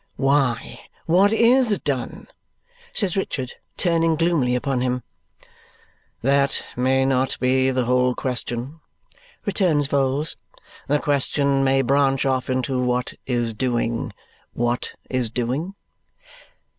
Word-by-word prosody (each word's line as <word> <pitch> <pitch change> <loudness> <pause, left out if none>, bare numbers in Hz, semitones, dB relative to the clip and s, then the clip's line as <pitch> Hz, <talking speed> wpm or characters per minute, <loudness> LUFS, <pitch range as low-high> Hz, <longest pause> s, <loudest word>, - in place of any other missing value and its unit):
"Why, 135 -4 +1 0.3
what 190 +5 +4
IS 230 -1 +4
done?" 130 -7 -4 0.7
says 195 -5 +2
Richard, 135 -9 -3 0.2
turning 165 -2 +2
gloomily 155 -7 +1
upon 130 0 -1
him. 125 0 -1 1.2
"That 140 +1 +2
may 130 +1 +2
not 130 0 0
be 130 +1 +2
the 130 -1 0
whole 125 0 +2
question," 125 +3 -4 0.7
returns 175 -8 +2
Vholes, 140 +2 0 0.5
"The 145 - +3
question 140 -1 +1
may 135 0 +3
branch 135 0 +2
off 130 -1 0
into 130 0 0
what 125 0 -1
is 120 -3 -1
doing, 120 0 -1 0.4
what 120 +1 -1
is 125 -3 -1
doing?" 130 - -3
135 Hz, 110 wpm, -22 LUFS, 125-145 Hz, 1.2 s, what